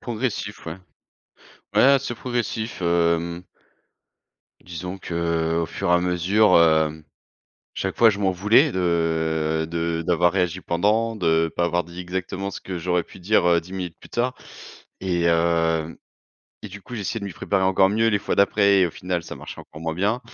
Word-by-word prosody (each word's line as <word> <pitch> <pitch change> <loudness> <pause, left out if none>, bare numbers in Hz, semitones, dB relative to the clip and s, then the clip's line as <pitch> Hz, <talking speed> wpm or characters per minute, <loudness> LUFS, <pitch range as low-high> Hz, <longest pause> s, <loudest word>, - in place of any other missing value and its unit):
Progressif 110 -5 -4
ouais. 80 - -5 1.0
Ouais - - +5
là 140 +1 +6
c'est 120 -3 -5
progressif, 120 -3 -3
hem 85 0 +1 1.2
disons 90 +2 -7
que, 85 -1 -1
au - - -2
fur 85 - -3
à 90 - +5
mesure, 90 +3 +3
hem, 80 -1 +2 0.7
chaque - - -3
fois 115 -2 +6
je 100 - -4
m'en 95 -2 +1
voulais 105 - +4
de 80 -3 0
de 85 0 -2
d'avoir 90 0 +3
réagi 90 -1 -1
pendant, 105 +7 0
de 80 -3 +1
pas 85 - +1
avoir 85 0 0
dit 85 +1 -9
exactement 95 +2 -4
ce - - -8
que 95 - -6
j'aurais 90 0 0
pu 95 - -15
dire, 90 -1 +2
heu, 85 -1 +4
10 90 +3 -13
minutes 90 -3 -5
plus - - -14
tard 125 +2 -1 0.7
et 85 -2 0
heu 85 -1 +1 0.7
et 105 - -7
du 105 +1 -11
coup, 125 - -9
j'essayais 110 +1 -3
de 100 - -6
m'y 100 - -5
préparer 95 +3 -1
encore 95 0 +4
mieux 110 +3 +2
les 105 -2 +2
fois 100 - -2
d'après 100 -1 +4
et 90 - +4
au - - -5
final 90 0 -3
ça - - -8
marchait - - -9
encore 75 - -13
moins 80 -1 -3
bien 105 +7 0
90 Hz, 180 wpm, -23 LUFS, 85-100 Hz, 1.2 s, là